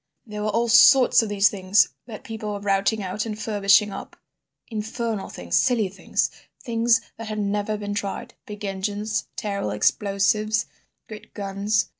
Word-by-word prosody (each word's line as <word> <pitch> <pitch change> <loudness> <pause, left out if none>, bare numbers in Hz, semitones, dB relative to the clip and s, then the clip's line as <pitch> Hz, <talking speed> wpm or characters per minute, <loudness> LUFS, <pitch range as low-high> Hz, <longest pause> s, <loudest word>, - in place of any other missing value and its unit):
There 210 -2 -6
were 215 - -1
all 230 +3 +1
sorts 245 +3 +7
of 225 - -3
these 205 0 +4
things 195 0 +3 0.2
that 220 -3 -9
people 215 -2 -5
were 205 - -4
routing 200 +1 0
out 210 +4 -3
and 215 -1 -5
furbishing 205 -1 +3
up; 195 - -8 0.5
infernal 220 -1 -4
things, 85 -1 -4
silly 230 -6 +2
things; 195 - -1 0.3
things 230 -2 +2 0.2
that 225 - -7
had 215 0 -4
never 205 +1 -1
been 205 0 -4
tried; 200 -1 -4
big 210 -1 -7
engines, 205 +2 -3
terrible 200 - -3
explosives, 205 - +1 0.4
great 215 -1 -11
guns. 205 +2 -1
210 Hz, 155 wpm, -24 LUFS, 200-220 Hz, 0.5 s, sorts